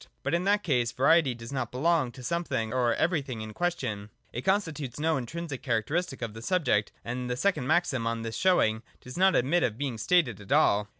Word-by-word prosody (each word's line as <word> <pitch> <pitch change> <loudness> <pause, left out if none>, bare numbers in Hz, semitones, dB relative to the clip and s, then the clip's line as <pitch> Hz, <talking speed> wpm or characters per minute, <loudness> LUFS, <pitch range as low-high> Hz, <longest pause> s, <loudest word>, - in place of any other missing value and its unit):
But, 140 - -1
in 170 +2 +1
that 205 +1 +2
case, 125 -7 +1
variety 140 0 +3
does 115 +3 -9
not 130 -4 -2
belong 150 0 +1
to 130 - -11
the - - -8
something 165 -10 -2
or 120 -3 +2
everything 140 -9 -1
in 110 0 -7
question: 125 -13 -2 0.2
it 120 - -3
constitutes 155 - -1
no 160 +1 +1
intrinsic 145 +2 -5
characteristic 135 +4 -1
of 115 -2 -4
the 110 - -9
subject: 145 - +1
and 125 +1 -4
the 125 - -2
second 150 -5 0
maxim 150 -7 +1
on 115 0 -2
this 115 -1 -4
showing 110 -9 +2 0.2
does 125 - -10
not 190 +1 +4
admit 155 +8 +2
of 110 -2 0
being 130 -5 -3
stated 120 - +2
at 100 - -12
all. 105 0 +4
130 Hz, 205 wpm, -28 LUFS, 115-170 Hz, 0.2 s, not